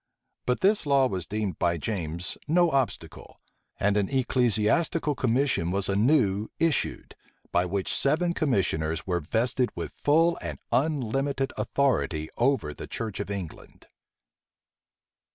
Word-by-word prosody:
But 125 - +1
this 200 -4 +3
law 140 -2 +4
was 95 -7 -4
deemed 105 -2 -3
by 85 -1 +1
James 85 -2 -3
no 170 +1 +3
obstacle; 135 -3 -3 0.4
and 100 0 +2
an 100 -2 +1
ecclesiastical 130 - +2
commission 130 -8 +1
was 95 +1 -1
anew 105 -1 +2
issued, 165 -2 -1 0.4
by 90 +1 +2
which 95 +1 -1
seven 170 +5 +1
commissioners[*] 80 - 0
were 90 -2 0
vested 120 - 0
with - - -5
full 165 +4 +2
and - - -5
unlimited 135 -1 0
authority 85 - 0
over 120 - +1
the - - -9
church 110 -3 -5
of 100 - -4
England. 95 -6 -7
115 Hz, 125 wpm, -27 LUFS, 95-140 Hz, 0.4 s, law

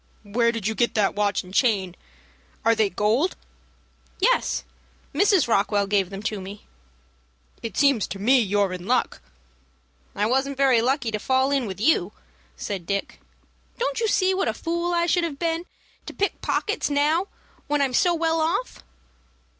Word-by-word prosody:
"Where 235 +3 +1
did 230 -4 -5
you 220 - +1
get 235 +2 0
that 210 -3 +2
watch 205 -1 0
and 185 +1 -14
chain? 195 -7 +1 0.7
Are 230 - +5
they 220 -2 +2
gold?" 215 - +1 0.8
"Yes, - - +1 0.5
Mrs. 375 - +3
Rockwell 205 -2 +2
gave 195 -2 +1
them 195 +1 -7
to 215 -2 -3
me." 195 +2 -10 1.0
"It 230 - -6
seems 275 -7 +3
to - - -6
me 250 +7 +4
you're 200 -3 +1
in 180 +1 -7
luck." 255 - 0 0.9
"I 205 - 0
wasn't 265 +4 0
very 265 -4 +4
lucky 255 -1 0
to 215 - -2
fall 260 +4 +1
in 270 -4 0
with 190 -1 -6
you," 210 - +2 0.4
said 185 - -5
Dick. 200 0 -3 0.6
"Don't - - -1
you 455 - +1
see 380 -2 +2
what 380 - 0
a - - -1
fool 340 +1 -2
I 340 0 +1
should 350 +1 +2
be 335 - 0
to 315 - -6
begin 330 +2 -2 0.4
to - - -6
pick 400 - -1
pockets 430 -6 -1
now 300 +6 +1 0.4
when 295 0 +1
I 280 - +3
am 260 - -4
so 345 +7 +3
well 325 0 0
off?" 355 +10 -2
250 Hz, 175 wpm, -24 LUFS, 205-325 Hz, 1.0 s, Are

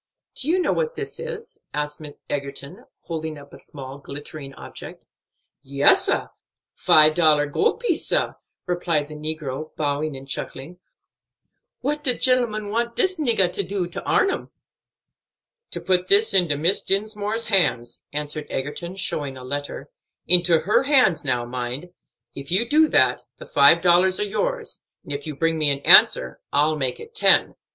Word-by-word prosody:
"Do 265 - -2
you 340 +4 +2
know 365 - 0
what 485 0 -2
this - - -6
is?" 475 -1 -8 0.2
asked 150 +1 -4 0.3
Egerton, 140 0 -6 0.2
holding 160 -2 -6
up 140 0 -15
a - - -11
small 135 -1 -10
glittering 140 0 -9
object. - - -11 0.6
"Yes, 140 +1 +3
sah; - - -1 0.4
five 155 0 +4
dollar 155 -3 +3
gold 280 - -1
piece, 395 -10 0
sah," - - 0 0.3
replied 170 -4 -2
the - - -9
negro, 155 -1 -6
bowing 145 0 -2
and 135 +1 -12
chuckling. 140 +5 -7 1.0
"What 295 +3 -2
de 250 -3 +3
gentleman 235 -5 +1
want 235 +2 -2
dis 375 -2 +1
niggah 220 - +1
do 195 -2 -2
for 175 - -12
to - - -5
arn 390 - +2
'em?" - - -6 1.2
"To - - -6
put 180 -1 0
this 415 +2 +3
into 175 -6 +3
Miss 170 +6 +3
Dinsmore's 210 +2 -2
hands," 125 - +1
answered 150 +1 -4
Egerton, 150 +7 -5
showing 145 -8 -4
a 130 - -11
letter; 145 - -6 0.3
"into 175 -2 +6
her 195 +7 +2
own - - -4
hands, 255 - +3
now, 125 -4 -1
mind. 125 +7 -6 0.4
If 140 0 -9
you 200 +7 +1
do 310 +4 +4
that, - - +2 0.2
the - - -11
five 145 +4 +4
dollars 180 +1 +3
are - - 0
yours; 480 - -2 0.2
and 145 - -7
if 140 +2 -6
you 150 - -6
bring 165 +2 -1
me 150 -1 +3
an 140 0 -1
answer, 65 - +6
I'll 150 +2 +1
make 130 -4 -3
it 460 - -12
ten. 445 - +4
165 Hz, 165 wpm, -22 LUFS, 145-215 Hz, 1.2 s, into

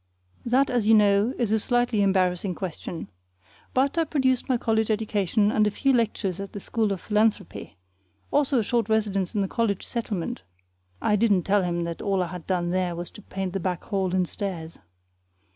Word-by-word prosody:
That, 260 +3 +3
as 240 -4 +1
you 225 - +7
know, 205 +2 +4
is 230 -4 0
a 220 - +3
slightly 245 -2 +1
embarrassing 185 -1 +1
question. 170 - -6 0.6
But 275 +5 +1
I - - +4
produced 265 -5 0
my 255 - +3
college 220 -1 0
education 210 -1 +1
and 215 -1 +3
a - - +3
few 270 +6 +1
lectures 210 -6 0
at 195 -1 -6
the 205 - -5
School 220 +1 -1
of 195 - -2
Philanthropy, 210 - -1 0.5
also 285 -2 +2
a 230 - +2
short 230 0 0
residence 205 -3 0
in 205 - +2
the 195 - 0
college 215 -3 -1
settlement 215 -7 -3 0.6
(I 210 - +3
didn't 205 -4 +3
tell 200 +3 +2
him 175 -1 -1
that 170 0 -5
all 195 -2 +1
I 175 - -5
had 175 -1 -8
done 175 -2 0
there 180 -1 0
was 175 +1 -5
to - - -12
paint 190 -2 -5
the 195 - -1
back 180 -1 -2
hall 190 -3 -1
and 180 -1 +1
stairs). 170 -5 -5
205 Hz, 195 wpm, -25 LUFS, 185-225 Hz, 0.6 s, you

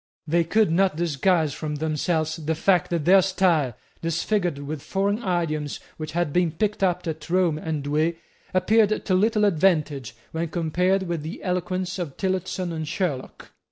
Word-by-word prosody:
They 170 +2 +2
could 210 +2 +2
not 185 0 +3
disguise 165 -1 +1
from 150 +1 -4
themselves 155 +1 -1
the 160 0 -2
fact 180 +1 +2
that 170 -4 -1
their 190 +2 +7
style, 175 - +2 0.3
disfigured 170 0 0
with 145 +1 -5
foreign 200 +6 -1
idioms 165 -7 -1 0.2
which 155 -1 -6
had 170 -4 0
been 175 -3 +2
picked 210 -2 -1
up 180 -2 +1
at 160 -1 -5
Rome 175 -3 +2
and 155 -3 -3
Douay, 155 +4 +1 0.4
appeared 215 +3 +3
to 190 - +1
little 210 +3 +3
advantage 150 - +1 0.2
when 165 +1 -2
compared 180 +4 +1
with 170 -3 -3
the 160 +5 -7
eloquence 180 0 -2
of 160 -6 -5
Tillotson 185 -2 -2
and 160 -1 -4
Sherlock. 165 -5 -3
170 Hz, 160 wpm, -24 LUFS, 155-185 Hz, 0.4 s, their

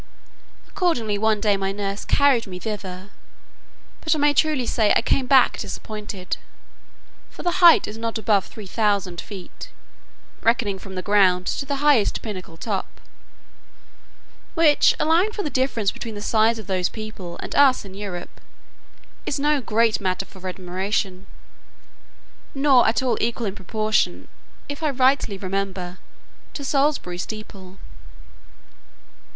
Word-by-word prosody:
Accordingly 235 - 0
one 220 0 +2
day 205 -1 +2
my 195 0 -1
nurse 200 0 -4
carried 275 -6 +3
me 180 -1 -7
thither, 190 -2 -6 0.9
but 320 -1 +2
I - - -2
may 290 0 +3
truly 290 -3 +2
say 220 -2 +2
I - - +2
came 260 -2 +1
back 265 -2 +5
disappointed; 210 -4 -5 0.9
for - - -11
the 355 +1 0
height 340 -2 +8
is 215 +1 -7
not 230 0 -2
above 205 -2 +2
three 215 - -10
thousand 200 -4 0
feet, 195 -4 -10 0.7
reckoning 225 -4 +1
from 190 -1 -10
the 185 - -4
ground 190 -3 +3
to 275 - -2
the 280 +1 -2
highest 270 -9 +3
pinnacle 185 -6 -7
top; 200 +1 -4 1.6
which, 315 -3 +5
allowing 335 +7 +3
for 415 - -3
the 300 - -3
difference 250 -6 0
between 225 -2 -7
the 205 - -6
size 225 +1 +3
of 220 - -8
those 185 -2 0
people 215 -5 -8
and - - -6
us 275 -6 +4
in 190 - -10
Europe, 190 -3 -7 0.9
is 280 - -1
no 295 0 +2
great 225 -1 +1
matter 185 0 -1
for 190 -1 -10
admiration, 185 +1 -3 1.3
nor 270 -3 +5
at 230 +4 +1
all 240 -4 0
equal 235 0 -1
in 195 - -2
proportion 205 - -1 0.4
(if 285 +2 -6
I 310 - +1
rightly 260 -5 +2
remember) 190 -1 -4 0.6
to 285 - -5
Salisbury 275 -11 0
steeple. 195 -2 -8
215 Hz, 140 wpm, -23 LUFS, 195-265 Hz, 1.6 s, height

